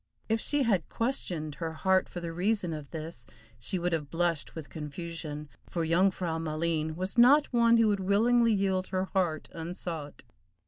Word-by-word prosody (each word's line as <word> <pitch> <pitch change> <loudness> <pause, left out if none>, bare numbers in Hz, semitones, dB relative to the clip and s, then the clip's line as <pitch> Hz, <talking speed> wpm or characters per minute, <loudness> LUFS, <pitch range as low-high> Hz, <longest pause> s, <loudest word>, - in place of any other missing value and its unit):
If 225 0 +1
she 290 +4 +1
had 200 -8 +1
questioned 180 - -2
her 165 +1 -4
heart 190 +3 +2
for 175 - -6
the 165 -1 -4
reason 185 -1 0
of 150 -2 -7
this 160 -6 -7 0.3
she 155 +10 -3
would 175 0 -1
have 150 -3 -2
blushed 170 -1 -1
with 160 -3 -6
confusion, 150 -1 -6 0.2
for 170 - -1
Jung 175 +4 +4
frau 170 -3 -3
Maleen 160 0 -1
was 185 +6 -1
not 275 +4 +6
one 235 -1 +5
who 230 -1 +5
would 205 -1 +1
willingly 230 +5 +3
yield 190 -2 +1
her 185 0 -1
heart 175 -6 -1
unsought. 165 -3 -6
175 Hz, 175 wpm, -29 LUFS, 160-200 Hz, 0.3 s, not